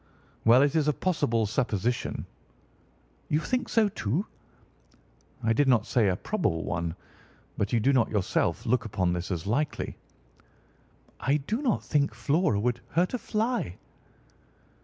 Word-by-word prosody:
"Well, 120 +4 +7
it 145 +2 +1
is 155 -2 +2
a 150 - +3
possible 140 -11 0
supposition." 115 0 -1 1.0
"You 150 - +2
think 255 +9 -2
so, 225 -2 +4
too?" 165 - -2 1.2
"I 115 0 +3
did 145 +4 +2
not 120 -4 +4
say 115 -3 +2
a 95 - +2
probable 110 - -1
one. 85 -1 -2 0.6
But 100 - -1
you 120 - +3
do 135 +6 +3
not 125 -4 +3
yourself 105 -4 0
look 125 - +2
upon 95 -5 0
this 90 +2 -3
as 85 -3 -3
likely?" 140 +9 -1 1.2
"I 140 +2 +2
do 210 - -3
not 250 -8 0
think 140 -6 +1
Flora 140 - +1
would 120 +2 0
hurt 175 - +2
a 250 - -1
fly." 225 - -1
125 Hz, 145 wpm, -28 LUFS, 105-160 Hz, 1.2 s, Well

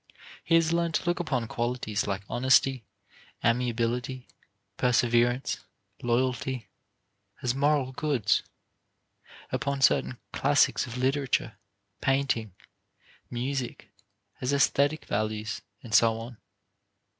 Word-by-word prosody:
He 165 - +3
has 165 0 +3
learned 170 -1 +1
to - - +1
look 175 +1 0
upon 135 -9 -1
qualities 120 -4 -2
like 100 0 -2
honesty, 130 0 +3 0.6
amiability, 120 +1 0 0.5
perseverance, 120 +1 +2 0.4
loyalty, 125 0 -1 0.7
as 120 -1 +1
moral 140 -1 +2
goods; 140 -4 +1 1.1
upon 140 -1 -1
certain 130 -2 +3 0.2
classics - - +3
of 120 +1 -6
literature, 130 -3 0 0.5
painting, 130 -7 0 0.7
music, 125 -3 -3 0.5
as 130 +2 0
aesthetic 140 +2 +2
values, 110 +1 -2 0.2
and 115 -4 -8
so 115 +1 +5
on. 115 +1 -8
125 Hz, 100 wpm, -28 LUFS, 115-135 Hz, 1.1 s, so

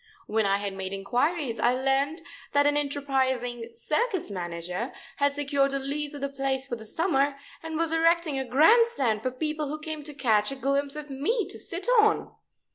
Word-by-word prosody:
When 220 -1 +1
I 195 0 +3
had 200 -1 -3
made 190 0 -5
inquiries 245 - -1
I 245 - +3
learned 270 +5 0 0.3
that 285 0 +4
an 290 0 +3
enterprising 260 -5 -1
circus 330 - -1
manager 180 +4 -4 0.3
had 285 0 +2
secured 280 -1 +1
a - - +1
lease 290 +2 -3
of 285 - -7
the 280 - 0
place 270 -1 -1
for 250 - -4
the 220 -1 -9
summer, 285 - +1 0.3
and 320 -1 -4
was 330 0 +1
erecting 325 -3 +2
a - - -1
grand 325 - +5
stand 240 - 0
for 255 - -1
people 305 +3 -2
who 300 +2 -3
came 310 0 -5
to 295 - -6
catch 220 -5 +2
a - - -4
glimpse 275 +1 0
of 300 -1 -7
me 350 - 0
to 390 - -8
sit 360 +5 -5
on. 430 0 +3
275 Hz, 195 wpm, -27 LUFS, 245-305 Hz, 0.3 s, grand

